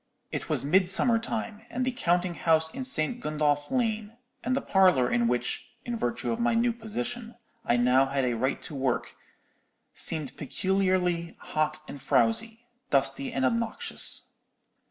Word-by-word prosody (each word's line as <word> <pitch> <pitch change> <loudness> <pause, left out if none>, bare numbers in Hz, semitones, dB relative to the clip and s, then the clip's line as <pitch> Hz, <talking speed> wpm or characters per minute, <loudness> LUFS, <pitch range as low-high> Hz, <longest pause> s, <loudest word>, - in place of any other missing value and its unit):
It - - -4
was - - -1
midsummer 190 - +4
time, 225 -2 -4
and 255 +1 -2
the 260 - 0
counting 175 -6 0
house 160 -1 +2
in 265 - -4
St. 245 -2 0
Gundolph 150 -5 0
Lane, 220 -3 -1 0.3
and 255 +2 0
the - - +2
parlour 185 -10 +4
in 120 0 +2
which—in 225 - -3
virtue 230 0 -2
of 230 - -2
my 235 0 +2
new 235 +1 +2
position—I 235 - -5
had 120 - +2
now 130 +2 +4
a 130 -3 +1
right 130 +4 -1
to - - -8
work, 130 -3 -1 0.8
seemed 155 -5 0
peculiarly 180 +1 0
hot 155 0 -1
and 140 - -8
frowsy, 185 - +1 0.2
dusty 135 0 +2
and 135 -1 0
obnoxious. 230 - 0
180 Hz, 145 wpm, -28 LUFS, 140-230 Hz, 0.8 s, midsummer